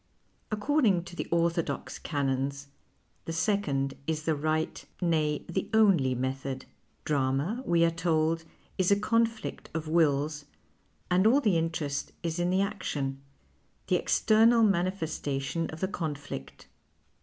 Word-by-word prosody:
According 215 - +2
to 175 - -10
the - - -4
ortliodox 170 0 -1
canons, 140 -1 -2 0.6
the - - -4
second 160 -6 0
is 155 -1 -1
the 160 - +1
right, 155 +2 -1 0.2
nay, 155 -4 0
the 175 - -3
only 175 -13 +4
method. 130 +1 -3 0.4
Drama, 145 - 0
we 170 -1 +4
are 165 - +2
told, 165 -1 +1 0.4
is 185 - +3
a 200 0 +4
conflict 230 +1 0
of 160 -1 -3
wills 150 -2 +1 0.7
and 185 +4 +4
all 255 +5 +5
the 210 -10 +2
interest 160 -4 -2
is 165 0 -2
in 175 0 +1
the 190 +2 +3
action, 145 -9 -3 0.7
the - - +4
external 225 +1 +4
manifestation 165 -6 0
of 160 - -8
the 190 - +1
conflict. 145 - -6
165 Hz, 130 wpm, -29 LUFS, 145-190 Hz, 0.7 s, all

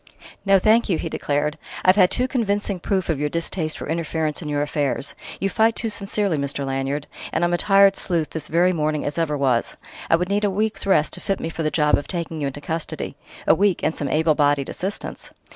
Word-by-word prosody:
"No, 195 0 +6
thank 220 +4 +3
you!" 175 - +2
he 165 - -4
declared. 150 0 -1 0.3
"I've 185 +1 +6
had 185 -3 +5
too 255 - +1
convincing 205 -6 -1
proof 190 0 -1
of 160 -4 0
your 150 0 0
distaste 165 0 -2
for - - -6
interference 160 -1 -2
in 155 - -5
your 145 0 0
affairs. 145 -1 -1 0.3
You 195 - +1
fight 220 +3 +2
too 225 - -2
sincerely, 200 -3 0
Mr. 140 0 -2
Lanyard 135 +2 -2 0.3
and - - 0
I'm 175 0 +2
a - - +3
tired 195 -1 +5
sleuth 165 -4 -1
this 160 - -5
very 175 +3 +3
morning 155 -2 -1
as 145 +3 -2
ever 150 -3 0
was! 130 -4 0 0.3
I - - +6
would 180 +2 -1
need 205 +1 +1
a 205 - +3
week's 210 +1 -1
rest 155 -6 +3
to - - -6
fit 195 - -1
me 165 - -3
for 165 - -5
the 155 - +1
job 150 -2 +3
of 145 - -9
taking 165 -3 -4
you 140 - 0
into 140 +2 -6
custody 160 +2 -4 0.3
a - - +6
week 200 -2 +1
and 160 - +1
some 145 - -3
able 155 +2 +3
bodied 145 -2 +2
assistance!... 195 +3 -5
165 Hz, 230 wpm, -22 LUFS, 150-195 Hz, 0.3 s, No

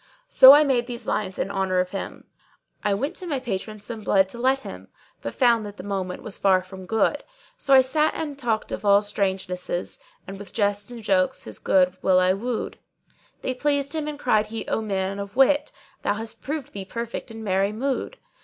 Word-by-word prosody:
So 265 - +10
I 295 +1 +7
made 250 -4 +1
these 240 -2 -7
lines 190 -3 -2
in 195 - -2
honour 190 -2 0
of 180 0 -1
him:— 195 - -6 0.6
I 205 -1 +2
went 280 - -3
to 365 - -6
my 285 -5 -1
patron 215 -3 -4
some 220 +2 -6
blood 195 -2 +3
to 235 - -8
let 265 +2 +2
him, 95 +1 -9 0.2
* - - -34
But 115 - -5
found 235 -3 +4
that 205 -1 -8
the - - -8
moment 190 -2 -4
was 210 - -5
far 190 -2 +3
from 185 0 -11
good: 225 +7 +1 0.4
So 275 -1 +4
I 260 - +9
sat 300 +4 +1
and 315 -2 -3
I - - -8
talked 235 -6 -2
of - - -4
all 200 0 +5
strangenesses, 190 -3 -3
* - - -37
And 195 +1 -8
with 205 -2 -10
jests 205 -1 0
and 240 -2 -9
jokes 185 -3 +1
his 110 - -7
good 185 -1 +2
will 185 -1 +4
I 185 0 +3
wooed: 230 +4 -4 0.6
They 260 - 0
pleased 285 +2 0
him 310 -2 -2
and 300 -1 -4
cried 215 -6 +2
he, 225 +1 -6
'O - - 0
man 195 -2 -2
of 200 0 -7
wit, 280 - +3 0.2
* - - -32
Thou - - 0
hast 225 +1 -7
proved 295 -1 -5
thee 200 - -5
perfect 235 +5 -5
in 225 0 -8
merry 195 0 +1
mood!' 270 - -3
215 Hz, 220 wpm, -24 LUFS, 195-255 Hz, 0.6 s, So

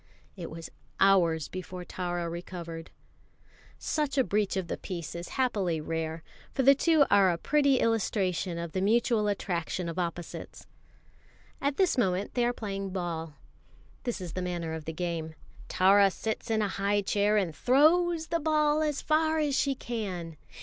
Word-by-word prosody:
It 175 -4 -7
was 165 0 -8 0.3
hours 170 -6 +4
before 185 -1 -7
Tara 175 -1 -3
recovered. 170 -1 -7 0.9
Such 295 -3 -2
a 265 - +5
breach 205 -3 0
of 190 - -1
the - - -2
peace 170 -4 -6
is 170 0 -6
happily 200 -11 +1
rare; 160 +1 -3 0.3
for 265 - 0
the 275 +2 +8
two 310 +1 +4
are 200 -2 +6
a 170 - 0
pretty 280 - +3
illustration 190 -5 0
of 170 -1 -4
the 185 - -2
mutual 225 +1 +2
attraction 180 -3 -2
of 170 +2 -4
opposites. 170 -1 -5 1.0
At 280 0 0
this 365 -8 +2
moment 190 -3 0
they 245 - +1
are 240 - +2
playing 195 -4 -4
ball. 165 -4 -4 0.7
This 240 -3 -3
is 175 -3 -6
the 185 - -3
manner 175 -3 -3
of 160 -1 -6
the 160 - -3
game: 165 -1 -4 0.3
Tara 195 +2 +5
sits 220 +4 -4
in 220 -1 +2
a - - +1
high 200 +1 0
chair 205 +2 +2
and 175 -7 0
throws 320 - +3
the 335 0 +1
ball 305 -1 +2
as 300 -3 -1
far 315 +1 +2
as 295 -3 +1
she 275 0 +1
can. 190 -10 -5
195 Hz, 165 wpm, -29 LUFS, 170-255 Hz, 1.0 s, the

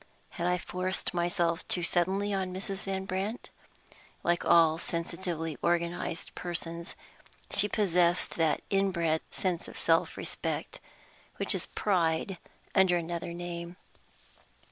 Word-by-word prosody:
Had 175 -2 -2
I 180 0 +3
forced 185 +1 -2
myself 170 -1 +1
too 175 - +1
suddenly 190 +4 +1
on 190 -1 -1
Mrs. 190 +1 -5
Van 190 -1 -2
Brandt? 195 +5 -3 0.7
Like 175 0 +2
all 165 -1 +5
sensitively 170 -3 -3
organized 170 0 0
persons, 170 0 -4 0.6
she 200 +1 +4
possessed 180 -4 +2
that 165 -2 +2
inbred 170 -5 +2
sense 180 -3 -1
of - - -9
self 165 0 +2
respect - - -3 0.6
which - - +4
is - - -2
pride 175 -1 +1 0.3
under 190 -2 +5
another 170 +1 -3
name. 170 0 -5
175 Hz, 120 wpm, -30 LUFS, 170-190 Hz, 0.7 s, all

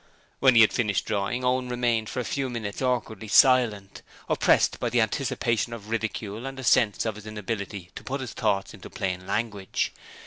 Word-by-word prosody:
When 130 -2 +5
he 115 - +8
had 110 - +5
finished 105 -7 0
drawing, 110 +4 -1
Owen 125 0 +1
remained 120 -3 0
for 130 - -4
a - - -1
few 135 -2 -2
minutes 110 -3 -5
awkwardly 115 -4 -1
silent, 110 -4 +4 0.3
oppressed - - +3
by 120 - -1
the 120 +1 +1
anticipation 115 -1 0
of 110 -1 -9
ridicule 110 +1 -3
and 135 0 -7
a - - -6
sense 120 -4 +3
of 110 - -1
his 105 0 -11
inability 100 -3 -5
to - - -9
put 135 +2 -3
his 130 - -6
thoughts 100 -3 -1
into - - -11
plain 90 -1 -4
language. 105 -4 -2
115 Hz, 185 wpm, -26 LUFS, 105-125 Hz, 0.3 s, he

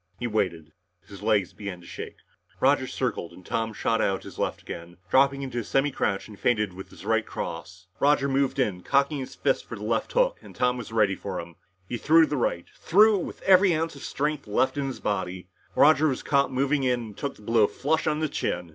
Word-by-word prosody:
He 120 - -4
waited 90 -9 -1 0.4
his 100 -1 -11
legs 105 -4 +1
began 100 -4 -6
to 85 - -16
shake. - - -8 0.4
Roger - - +3
circled 85 - -3
and 90 - -15
Tom 115 0 -1
shot 115 +1 0
out 95 -1 0
the - - -8
left - - -2
again, 85 +1 -8
dropped 135 +1 +6
into 135 -3 -4
a - - -3
semicrouch 135 -6 0
and 105 -2 -13
feinted 105 -5 +1
with 95 +1 -9
the - - -12
right - - +2
cross. 90 +1 -7
Roger 140 -1 +3
moved 135 0 +1
in, 105 -9 0
cocking 140 - +1
his 130 - -7
fist - - 0
for - - -8
the - - -9
left - - -1
hook - - +2
and - - -14
Tom 125 0 +2
was 120 -3 -7
ready 105 -3 +3
for 95 -1 -5
him. 85 0 -9 0.3
He 120 - -3
threw 160 +5 +5
the 150 - -3
right, 85 -8 -1
threw 210 +3 +4
it - - -3
with - - -9
every 190 -2 +6
ounce 160 0 -2
of 140 - -11
strength 150 -2 -2
left 105 +5 +1
in 140 -1 -1
his 135 - -5
body. 95 -2 -3 0.3
Roger 155 +1 +6
was 135 -4 -2
caught 140 -2 +2
moving 140 +2 +1
in 125 -2 +1
and 110 -3 -8
took 140 - -4
the 105 - -17
blow 110 -1 +4
flush 155 +4 -1
on 155 0 0
the 155 - +1
chin. 90 - -3
125 Hz, 225 wpm, -26 LUFS, 100-140 Hz, 0.4 s, dropped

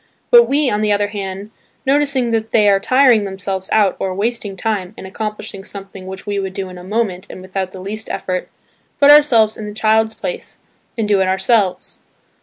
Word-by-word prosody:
But 475 -1 +7
we, 290 +1 +2
on 210 -4 0
the 210 -1 +1
other 205 0 +1
hand, 200 0 -6 0.3
noticing 270 -3 +1
that 225 -1 -1
they 210 -2 +4
are 200 -1 +4
"tiring 255 0 +4
themselves 190 -1 -5
out" 205 -3 +3
or 190 -1 -2
"wasting 210 -1 -2
time" 200 -1 -3
in - - -9
accomplishing 210 0 -6
something 195 -1 -10
which 190 0 -8
we 205 -1 -2
would 190 -1 -4
do 190 -1 -4
in 180 -1 -10
a - - -11
moment 195 -2 -2
and - - -9
without 185 0 -4
the 190 - -10
least 210 +4 -6
effort, 185 -1 -3 0.5
put 285 0 +7
ourselves 240 -8 +5
in 215 - -6
the 210 - -8
child's 220 0 +2
place - - -6 0.4
and 220 -2 -1
do 200 -2 +3
it 190 - +2
ourselves. 190 0 0
205 Hz, 200 wpm, -18 LUFS, 190-225 Hz, 0.5 s, But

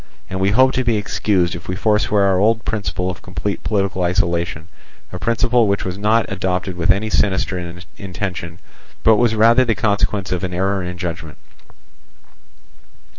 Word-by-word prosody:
And 95 - -3
we 95 +1 +2
hope 130 +5 +4
to 130 - 0
be 115 -3 +1
excused 100 -3 0
if 85 -1 -8
we 90 - -3
forswear 105 0 +2
our 95 -2 +3
old 110 +2 +2
principle 90 -4 -2
of 90 - -10
complete 90 +3 -4
political 100 -3 -1
isolation, 85 -3 -1 0.5
a 90 - -5
principle 115 +3 +2
which 100 0 0
was 90 -1 -3
not 110 +3 +2
adopted 95 -1 -2
with 85 -1 -2
any 105 +3 +3
sinister 90 -3 0 0.2
intention, 90 -3 -5 0.5
but 110 -1 +5
was 115 -1 +2
rather 115 +4 +5
the 115 -3 0
consequence 100 -3 0
of 90 -1 -2
an 90 -1 -3
error 95 +2 0
in 90 0 -6
judgment. 85 -3 -6
95 Hz, 165 wpm, -19 LUFS, 90-105 Hz, 0.5 s, but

